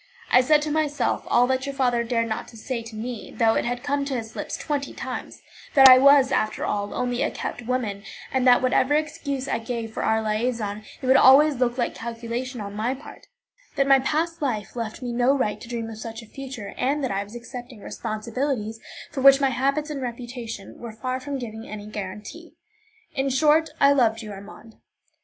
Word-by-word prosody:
I 250 Hz, -, +7 dB
said 295 Hz, +3 st, +4 dB
to 305 Hz, -, -2 dB
myself 300 Hz, -1 st, 0 dB
all 245 Hz, -, +4 dB
that 260 Hz, +1 st, -1 dB
your 275 Hz, -, -4 dB
father 245 Hz, -3 st, +1 dB
dared 230 Hz, -1 st, 0 dB
not 220 Hz, -, -4 dB
say 235 Hz, +2 st, -5 dB
to 225 Hz, -1 st, -10 dB
me, 230 Hz, +1 st, -6 dB
though 225 Hz, -1 st, +4 dB
it -, -, 0 dB
had 245 Hz, +1 st, -3 dB
come 285 Hz, 0 st, 0 dB
to 275 Hz, -1 st, -2 dB
his 225 Hz, -2 st, -5 dB
lips -, -, -4 dB
twenty 285 Hz, -2 st, -3 dB
times: -, -, -6 dB, 0.3 s
that 270 Hz, -1 st, +10 dB
I 255 Hz, 0 st, +10 dB
was, 280 Hz, 0 st, +6 dB
after 215 Hz, 0 st, 0 dB
all, 205 Hz, 0 st, -2 dB
only 245 Hz, 0 st, -1 dB
a -, -, +2 dB
kept -, -, -5 dB
woman, 230 Hz, -6 st, -1 dB, 0.3 s
and 260 Hz, -1 st, +2 dB
that 250 Hz, 0 st, +6 dB
whatever 260 Hz, +2 st, +3 dB
excuse 280 Hz, -3 st, -2 dB
I -, -, -1 dB
gave 225 Hz, -1 st, -5 dB
for -, -, -3 dB
our 220 Hz, -, +2 dB
liaison, 215 Hz, -1 st, -1 dB, 0.2 s
it -, -, -2 dB
would 260 Hz, +1 st, +6 dB
always 280 Hz, +2 st, +7 dB
look 245 Hz, 0 st, 0 dB
like 240 Hz, -, 0 dB
calculation 235 Hz, +2 st, -5 dB
on 200 Hz, -1 st, -6 dB
my 230 Hz, +5 st, -1 dB
part; 275 Hz, -, -13 dB, 0.5 s
that 275 Hz, -, +2 dB
my 275 Hz, 0 st, +6 dB
past 320 Hz, +5 st, -1 dB
life 220 Hz, -7 st, -2 dB
left 230 Hz, +1 st, -5 dB
me 245 Hz, -, -3 dB
no 245 Hz, +4 st, +3 dB
right 210 Hz, -5 st, -1 dB
to 235 Hz, -, -10 dB
dream 230 Hz, -2 st, -3 dB
of 220 Hz, -1 st, -8 dB
such 225 Hz, +1 st, -7 dB
a -, -, -12 dB
future, 260 Hz, -3 st, -8 dB
and 285 Hz, +3 st, 0 dB
that 260 Hz, -, -1 dB
I 195 Hz, +1 st, -1 dB
was 205 Hz, +3 st, -13 dB
accepting 240 Hz, -1 st, -9 dB
responsibilities 225 Hz, +1 st, -3 dB, 0.3 s
for 275 Hz, -, -4 dB
which 275 Hz, +1 st, +8 dB
my 270 Hz, -1 st, +2 dB
habits 275 Hz, +4 st, 0 dB
and 280 Hz, -2 st, -4 dB
reputation 240 Hz, -3 st, -7 dB
were 235 Hz, -2 st, -7 dB
far 255 Hz, +4 st, -3 dB
from 280 Hz, +1 st, -4 dB
giving 225 Hz, -3 st, -7 dB
any 210 Hz, -1 st, -7 dB
guarantee. 210 Hz, -, -8 dB, 0.6 s
In 275 Hz, -2 st, 0 dB
short, 305 Hz, +4 st, +3 dB
I 280 Hz, -, +6 dB
loved 230 Hz, -4 st, +2 dB
you, 210 Hz, -, -7 dB
Armand. 205 Hz, +3 st, -12 dB
245 Hz, 205 wpm, -24 LUFS, 225-275 Hz, 0.6 s, that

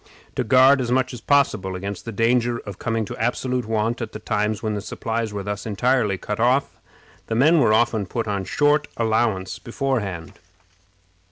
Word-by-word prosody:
To -, -, 0 dB
guard 130 Hz, +4 st, +5 dB
as 120 Hz, -, -2 dB
much 130 Hz, 0 st, +1 dB
as 120 Hz, -, -8 dB
possible 115 Hz, -10 st, +1 dB
against 100 Hz, +1 st, -6 dB
the 115 Hz, -, -4 dB
danger 120 Hz, +2 st, +1 dB
of 100 Hz, -3 st, -9 dB
coming 115 Hz, -1 st, -1 dB
to -, -, -7 dB
absolute 125 Hz, +1 st, -1 dB
want 115 Hz, +2 st, -1 dB
at 115 Hz, -, -5 dB
the 110 Hz, -, -6 dB
times 105 Hz, 0 st, -1 dB
when 110 Hz, -1 st, -1 dB
the 105 Hz, -, -3 dB
supplies 115 Hz, +1 st, -3 dB
were 100 Hz, -1 st, -4 dB
thus 105 Hz, +2 st, -4 dB
entirely 110 Hz, -1 st, +1 dB
cut 105 Hz, +3 st, -5 dB
off, 125 Hz, +4 st, +1 dB, 0.5 s
the 110 Hz, -, -2 dB
men 155 Hz, +8 st, +5 dB
were 115 Hz, -6 st, +4 dB
often 110 Hz, -2 st, +2 dB
put 115 Hz, +3 st, -3 dB
on 100 Hz, -2 st, -2 dB
short 145 Hz, +4 st, +2 dB
allowance 110 Hz, -4 st, 0 dB
beforehand. 115 Hz, -, -3 dB
115 Hz, 180 wpm, -22 LUFS, 105-125 Hz, 0.5 s, guard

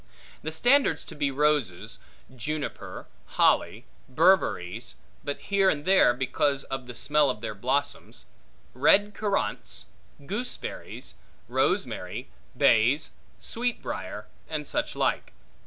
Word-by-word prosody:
The 155 Hz, -, -4 dB
standards 250 Hz, -, +3 dB
to -, -, -9 dB
be 145 Hz, -1 st, 0 dB
roses; 140 Hz, -9 st, 0 dB, 0.4 s
juniper; 150 Hz, +4 st, -5 dB, 0.3 s
holly; -, -, +3 dB, 0.2 s
berberries 155 Hz, -, +2 dB, 0.3 s
(but 145 Hz, -, -3 dB
here 195 Hz, -1 st, +2 dB
and 145 Hz, -2 st, -1 dB
there, 190 Hz, -8 st, +6 dB
because 135 Hz, +2 st, 0 dB
of 135 Hz, -2 st, -5 dB
the 125 Hz, -, -8 dB
smell 145 Hz, +2 st, +3 dB
of 105 Hz, -5 st, -3 dB
their 110 Hz, -, -4 dB
blossoms); 130 Hz, +7 st, -2 dB, 0.5 s
red 200 Hz, +11 st, +4 dB
currants; 205 Hz, -2 st, -2 dB, 0.4 s
gooseberries; 225 Hz, -, -5 dB, 0.3 s
rosemary; -, -, -1 dB, 0.3 s
bays; -, -, +4 dB, 0.3 s
sweetbriar; 245 Hz, +1 st, -3 dB, 0.2 s
and -, -, -3 dB
such -, -, -2 dB
like. -, -, 0 dB
145 Hz, 105 wpm, -27 LUFS, 130-195 Hz, 0.5 s, there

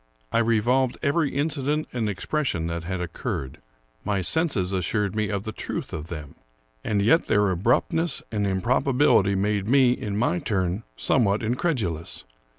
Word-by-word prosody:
I -, -, +2 dB
revolved 120 Hz, +3 st, +2 dB
every 145 Hz, +1 st, +2 dB
incident 145 Hz, +1 st, 0 dB
and 115 Hz, -4 st, -1 dB
expression 105 Hz, -, -2 dB
that 85 Hz, 0 st, -4 dB
had 95 Hz, 0 st, -3 dB
oc 85 Hz, -2 st, -5 dB
curred. 65 Hz, -1 st, -4 dB, 0.5 s
My 100 Hz, -2 st, 0 dB
senses 100 Hz, -, +1 dB
assured 100 Hz, +2 st, 0 dB
me 110 Hz, -1 st, 0 dB
of 100 Hz, -1 st, -2 dB
the 110 Hz, -, -4 dB
truth -, -, -5 dB
of 80 Hz, 0 st, -5 dB
them; 75 Hz, -5 st, -7 dB, 0.5 s
and 100 Hz, -2 st, 0 dB
yet 160 Hz, +11 st, +4 dB
their 105 Hz, -2 st, +3 dB
abruptness 125 Hz, -, +1 dB
and 105 Hz, -2 st, 0 dB
improbability 115 Hz, +1 st, +2 dB
made 100 Hz, 0 st, 0 dB
me, 130 Hz, 0 st, +5 dB
in 105 Hz, -4 st, -3 dB
my 105 Hz, -6 st, +1 dB
turn, 95 Hz, 0 st, -1 dB, 0.2 s
somewhat 110 Hz, -4 st, +2 dB
incredulous. 110 Hz, -, -2 dB
105 Hz, 155 wpm, -25 LUFS, 95-130 Hz, 0.5 s, me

